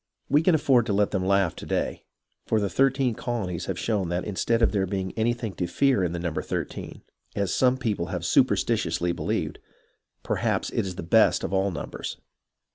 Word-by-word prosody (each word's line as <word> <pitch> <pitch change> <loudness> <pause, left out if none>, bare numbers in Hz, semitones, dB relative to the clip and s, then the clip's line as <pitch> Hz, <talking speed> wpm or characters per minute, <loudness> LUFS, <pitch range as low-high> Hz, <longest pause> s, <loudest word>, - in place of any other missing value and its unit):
We 145 +3 +4
can 165 0 +4
afford 130 -6 +3
to 105 - 0
let 100 0 +2
them 95 -3 0
laugh 100 -3 +2
to - - -7
day, - - -2 0.4
for 110 - +2
the 100 -2 -1
thirteen 135 -2 +2
colonies 110 -8 -3
have 95 - -2
shown 100 -2 -1
that 90 0 -2
instead 115 +4 0
of - - +4
there 95 -2 0
being 95 0 -2
anything 115 -1 -1
to 90 - -1
fear 125 +3 +2
in 85 - 0
the 85 - -3
number 85 -2 -2
thirteen, - - -5 0.3
as 100 -2 0
some 130 0 +3
people 105 -9 -2
have - - -4
superstitiously 85 0 +2
believed, - - -2 0.6
perhaps - - -1
it - - -1
is 90 - -5
the - - -6
best 110 +7 +4
of - - -3
all 95 +1 +2
numbers. 85 - -6
100 Hz, 195 wpm, -26 LUFS, 90-120 Hz, 0.6 s, We